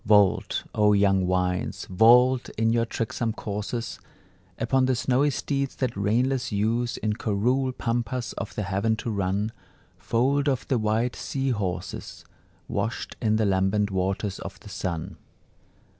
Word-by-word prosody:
Vault, 105 -2 +3
O 105 -1 +4
young 95 -2 +3
winds, 90 0 -1
vault 120 +6 +5
in 115 +1 +2
your 115 0 +1
tricksome 115 0 -2
courses 110 +3 -4 0.6
Upon 130 +3 +2
the 130 - +2
snowy 130 +4 +2
steeds 140 -1 -2
that 125 -3 -2
reinless 125 +6 +1
use 115 +4 0
In 105 -1 -1
coerule 120 +5 0
pampas 120 0 -2
of - - -6
the 105 - -2
heaven 100 +4 0
to 115 +1 -4
run, 100 +2 -1 0.5
Foaled 140 +5 +1
of 130 -2 -1
the 130 - +2
white 110 +3 0
sea 135 -1 -2
horses, 100 -6 -4 0.4
Washed - - -3
in 110 -1 +2
the 110 0 +2
lambent 100 +1 +1
waters 95 +1 -1
of 95 - -8
the 105 - -11
sun. 85 -3 -4
110 Hz, 145 wpm, -26 LUFS, 100-125 Hz, 0.6 s, vault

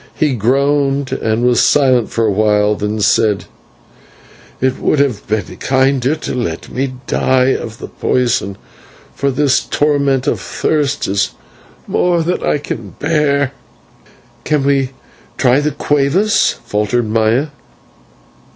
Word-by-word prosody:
He 150 -3 +1
groaned 135 +3 +1
and 110 -2 -1
was 125 -1 +3
silent 130 -5 +3
for 115 - 0
a 105 - +2
while, 105 0 +2
then 105 +1 -3
said: 105 -1 +2 1.1
"It 130 0 0
would - - +1
have 135 -7 0
been 110 -1 -3
kinder 135 +1 +1
to - - -5
let 100 -10 -4
me 130 0 -2
die 130 0 +2
of 110 -1 -6
the - - -8
poison, 120 -6 -1 0.6
for 140 - -1
this 140 0 +2
torment 140 -3 0
of - - 0
thirst 145 -2 -1
is 100 +1 -1 0.5
more 175 -2 +1
than 175 +3 -1
I - - +1
can 115 - -7
bear." 145 -3 +1 0.9
"Can 150 -2 0
we 135 -2 +1 0.5
try 125 +1 +3
the 150 +1 0
/cueva/?" 150 +9 +1
faltered 105 +3 -1
Maya. 115 +6 +1
130 Hz, 130 wpm, -16 LUFS, 110-145 Hz, 1.1 s, was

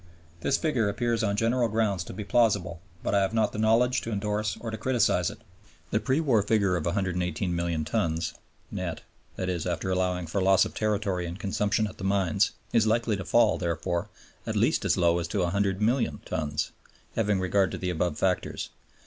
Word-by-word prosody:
This 135 - +1
figure 125 -10 +1
appears 115 +2 0
on 100 -2 +1
general 115 +3 +2
grounds 105 -5 0
to - - -8
be 105 - -5
plausible, 100 -7 +1 0.2
but - - -1
I 100 - +4
have 95 +4 0
not 110 -2 +2
the 105 - -4
knowledge 120 +3 +3
to 115 - -5
endorse 105 0 -1
or 115 - -5
to 110 - -4
criticize 115 -9 +2
it. - - -9 0.5
The 110 - +2
pre 135 +5 +1
war 130 -9 +3
figure 100 -3 +2
of 85 - -2
118,000,000 85 -3 -1
tons 85 -3 -1 0.4
net - - -4 0.4
(i.e. 90 -1 -1
after 90 +1 -2
allowing 90 -1 0
for 90 +5 -2
loss 95 0 +5
of - - -6
territory 100 -4 -1
and 85 +2 -6
consumption 105 +1 0
at 105 - -8
the - - -6
mines) 100 +1 +2 0.2
is 110 -2 +4
likely 115 0 +2
to 95 -2 -5
fall, 120 +8 +3
therefore, 85 +2 -2 0.4
at - - -2
least - - +2
as - - +2
low 85 0 +3
as 85 - -3
to 95 +3 -1
100,000,000 100 +7 0
tons, 75 -1 -2 0.4
having 105 -3 +1
regard 95 +1 +2
to - - -5
the 90 -1 -2
above 85 -2 -1
factors. 90 +2 -1
100 Hz, 190 wpm, -27 LUFS, 90-110 Hz, 0.5 s, loss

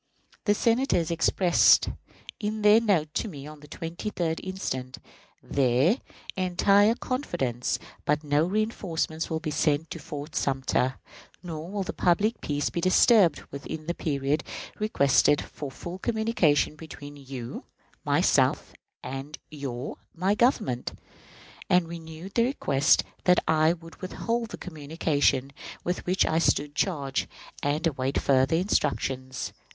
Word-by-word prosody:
The 205 -1 +3
Senators 230 - +2
expressed, 170 +1 +4 0.5
in 215 0 -3
their 210 +2 +7
note 165 -9 +1
to - - -1
me 145 -7 -8
of 150 -1 -11
the 150 - -13
23d 165 +1 -3
instant, 135 -9 -4 0.5
their 135 - +2 0.4
"entire 195 +4 +4
confidence 155 - -2 0.3
that 150 +1 +1
no 150 +3 +2
reënforcements 185 -6 -1
will 160 - -1
be 160 -1 -4
sent 150 +1 +1
to 165 - -5
Fort 145 +1 -7
Sumter, 130 -1 0 0.5
nor 165 -1 -6
will 200 0 -2
the - - -5
public 205 +6 +1
peace 145 -1 -1
be 170 - -2
disturbed 185 -1 +5
within 145 +3 -6
the 170 - -1
period 145 -1 -1 0.4
requisite 145 -8 +3
for 145 - -7
full 175 +7 -8
communication 220 -11 +1
between 145 -2 -10
you 135 -4 -7 0.4
(myself) - - +2 0.3
and 135 +4 -6
your 135 -4 -5 0.2
(my) 185 +4 +1
Government"; 210 - +1 0.8
and 180 -2 +4
renewed 165 +2 -9
their 230 +1 +3
request 145 - +3 0.2
that 180 -1 +5
I 155 +1 +4
would 165 -1 -13
withhold 230 +5 -2
the - - -7
communication 145 -4 0 0.3
with 180 +1 -3
which 185 +2 +3
I 160 - +1
stood 145 -3 +1
charged, 145 -6 -1 0.3
and 150 +4 0
await 135 -3 0
further 135 +2 +3
instructions. 130 -8 -1
160 Hz, 130 wpm, -27 LUFS, 145-190 Hz, 0.8 s, their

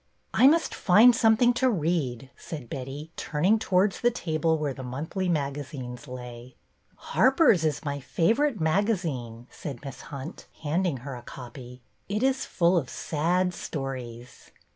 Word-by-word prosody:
I 260 - +6
must 325 +3 +3
find 225 +6 +6
something 225 +2 +4
to 255 +1 +2
read," 150 - -1
said 145 -8 -8
Betty, 140 +4 -6
turning 180 +9 +1
towards 190 0 +1
the 240 - +4
table 160 -7 0
where 150 -3 -2
the 130 - -9
monthly 155 +9 -3
magazines 140 -4 -4
lay. 125 -1 -9 0.2
" - - -38 0.2
Harper's 260 - +4
is 155 -1 -1
my 140 0 -2
favorite 225 - +1
magazine," 160 - -1
said 140 -2 -8
Miss 135 - -7
Hunt, 140 +4 -8 0.2
handing 165 0 0
her 140 - -5
a 120 - -8
copy. 125 0 -10
'' - - -41
It 210 +4 -1
is 265 0 +1
full 175 0 +2
of 140 -7 -1
sad 180 +4 0
stories." 130 -6 -7
155 Hz, 150 wpm, -27 LUFS, 130-190 Hz, 0.2 s, I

